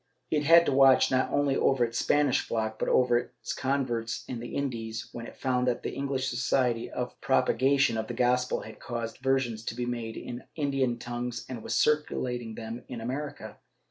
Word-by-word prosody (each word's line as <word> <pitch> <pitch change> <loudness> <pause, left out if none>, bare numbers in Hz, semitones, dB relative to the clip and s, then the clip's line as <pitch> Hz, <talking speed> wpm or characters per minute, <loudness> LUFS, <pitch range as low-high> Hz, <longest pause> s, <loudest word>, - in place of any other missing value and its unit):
^ - - +4
It 150 -1 +1
had 170 +2 +7
to - - +1
watch 135 -1 +6
not 130 0 +2
only 140 -1 +2
over 135 -3 +3
its 115 0 -3
Spanish 145 -3 +3
flock, 110 -1 -3
but - - 0
over 125 -1 +4 0.2
its - - -4
converts 125 -4 -1
in 125 - -4
the 120 - -7
Indies, 115 -5 -3
when 115 0 -7
it - - -12
found 125 -1 0
that 125 - 0
the - - -2
English 135 -1 -2
Society 120 -1 0
for - - -4
the - - -24
Propagation 135 0 +3
of 110 - -3
the 120 - -5
Gospel 125 +1 +1
had 110 -1 -11
caused 115 -1 -5
versions 130 -4 0
to - - -3
be 120 0 -2
made 120 -2 -4
in 120 - -6
the - - -13
Indian 135 -5 0
tongues 120 0 -4
and 125 -3 -6
was - - -2
circulating 125 -6 0
them 115 +2 -6
in 120 - -6
America. 135 +6 -5
125 Hz, 205 wpm, -28 LUFS, 115-135 Hz, 0.2 s, had